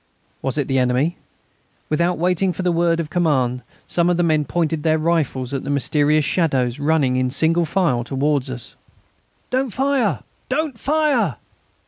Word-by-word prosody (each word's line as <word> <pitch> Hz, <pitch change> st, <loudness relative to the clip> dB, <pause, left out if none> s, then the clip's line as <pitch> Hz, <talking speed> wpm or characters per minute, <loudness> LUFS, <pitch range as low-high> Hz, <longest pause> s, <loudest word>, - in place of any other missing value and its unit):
Was 135 Hz, +2 st, -3 dB
it 145 Hz, -, 0 dB
the 135 Hz, -1 st, +1 dB
enemy? 130 Hz, +6 st, +1 dB, 0.7 s
Without 170 Hz, +3 st, +1 dB
waiting 180 Hz, +2 st, +1 dB
for 185 Hz, -, -4 dB
the 180 Hz, -, +2 dB
word 170 Hz, 0 st, +1 dB
of 160 Hz, -1 st, -4 dB
command 135 Hz, -8 st, +1 dB, 0.2 s
some 170 Hz, 0 st, +1 dB
of 175 Hz, -, +2 dB
the 175 Hz, -, +2 dB
men 155 Hz, -3 st, +2 dB
pointed 160 Hz, +1 st, -1 dB
their 160 Hz, +1 st, +2 dB
rifles 155 Hz, -5 st, -1 dB
at 135 Hz, -, -2 dB
the -, -, -5 dB
mysterious 145 Hz, +2 st, +2 dB
shadows 135 Hz, -7 st, 0 dB
running 145 Hz, -4 st, +2 dB
in 130 Hz, 0 st, +1 dB
single 165 Hz, +5 st, +1 dB
file 155 Hz, -8 st, +1 dB
towards 135 Hz, +1 st, 0 dB
us. 125 Hz, -2 st, -8 dB, 0.8 s
"Don't 260 Hz, +1 st, 0 dB
fire! 265 Hz, -, 0 dB, 0.3 s
Don't 290 Hz, 0 st, -1 dB
fire!" 280 Hz, -, +1 dB
160 Hz, 160 wpm, -20 LUFS, 135-175 Hz, 0.8 s, the